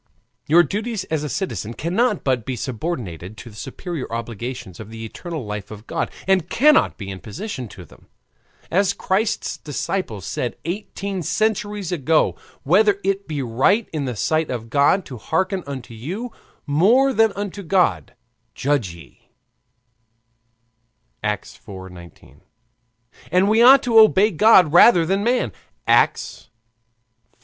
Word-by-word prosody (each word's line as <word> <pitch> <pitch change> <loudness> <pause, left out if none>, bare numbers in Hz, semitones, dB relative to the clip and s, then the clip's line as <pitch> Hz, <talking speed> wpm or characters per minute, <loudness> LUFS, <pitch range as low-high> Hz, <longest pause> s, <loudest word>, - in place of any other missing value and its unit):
Your 170 +4 +6
duties 210 +4 -3
as 155 -2 0
a 150 - -3
citizen 120 - -4
cannot 195 +6 0
but 130 -4 0
be 130 - -4
subordinated 110 - -5
to 120 +3 -10
the - - -16
superior 165 - -6
obligations 115 -2 -6
of 110 -1 -9
the 115 0 -8
eternal 160 +3 -7
life 105 -1 -6
of 110 0 -10
God, - - -2 0.2
and 185 -3 +2
cannot 300 +4 +4
be 100 -3 -6
in 95 - -7
opposition 130 - -6
to 90 -4 -12
them. - - -20 0.6
As 195 +2 +2
Christ's 205 +4 -1
disciples 145 - -4
said 120 - -3
eighteen 195 +1 -4
centuries 210 +1 -1
ago: 160 -1 +2 0.3
"Whether 200 +6 +3
it 195 +1 -1
be 150 -4 -3
right 135 - +2
in 150 -3 -2
the 125 -2 -3
sight 155 +8 0
of 115 -3 -5
God 145 +7 +3
to 130 - -8
hearken 190 - -1
unto 130 -4 -7
you 185 - -6 0.3
more 225 - +3
than 225 -2 +4
unto 200 0 -5
God, 185 0 +1 0.4
judge 130 -11 -1
ye" 80 -5 -17 1.9
(Acts 105 -2 -3
iv. 95 -2 -9
19); 85 -2 -15 0.9
and, 185 +2 +3
"We 220 +2 +4
ought 265 +3 +8
to 230 -2 +5
obey 215 -1 +5
God 185 -3 +5
rather 175 -1 +7
than 195 +4 0
men" 240 - +1 0.3
(Acts - - +1 0.9
v. - - -40
160 Hz, 145 wpm, -21 LUFS, -, 1.9 s, ought